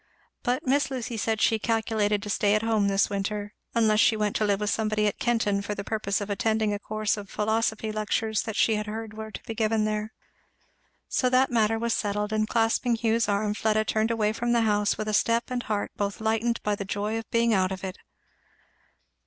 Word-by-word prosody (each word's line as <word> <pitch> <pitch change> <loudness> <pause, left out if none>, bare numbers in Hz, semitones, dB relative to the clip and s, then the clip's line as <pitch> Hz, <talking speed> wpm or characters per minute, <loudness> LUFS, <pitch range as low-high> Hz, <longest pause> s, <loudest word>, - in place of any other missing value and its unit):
But 255 +4 -1
Miss 275 +2 +2
Lucy 250 -3 -4
said 220 0 -1
she 220 0 +3
"calculated 215 -2 0
to 210 - -6
stay 205 +1 +2
at 215 - 0
home 220 -3 +2
this 195 +1 +3
winter," 205 +1 -3 0.2
unless 215 -2 +3
she 225 -1 +4
went 210 -1 -1
to - - 0
live 200 -2 +1
with 210 0 0
somebody 215 -1 0
at 205 - -1
Kenton 225 -5 +1
for 205 +1 -4
the 200 - -5
purpose 205 -1 -1
of 205 - -3
attending 220 +1 +1
a 205 - -3
course 215 +1 -1
of 200 -1 -8
philosophy 220 0 0
lectures 215 0 -1
that 220 -3 -5
she 220 - +3
heard 215 +1 -5
were 220 0 -7
to - - -9
be 225 - -5
given 220 -1 +1
there. 215 0 -2 1.0
So 255 - +1
that 255 +1 +3
matter 225 -1 +2
was 230 +1 0
settled; 210 0 -1
and 215 0 +1
clasping 230 +2 +1
Hugh's 230 -1 +1
arm 205 +1 +1
Fleda 215 0 +1
turned 220 +1 +1
away 215 -2 +1
from 240 +1 -1
the 235 - +3
house 210 -2 +1
with 215 - -3
a 215 - -1
step 230 +4 +1
and 250 -1 -1
heart 210 -3 -2
both 200 -1 -2
lightened 225 +1 0
by 210 - +1
the 200 - -3
joy 205 +3 -2
of 225 - -10
being 230 0 +2
out 190 -2 +2
of 190 0 -5
it. 190 0 -5
215 Hz, 215 wpm, -26 LUFS, 210-225 Hz, 1.0 s, she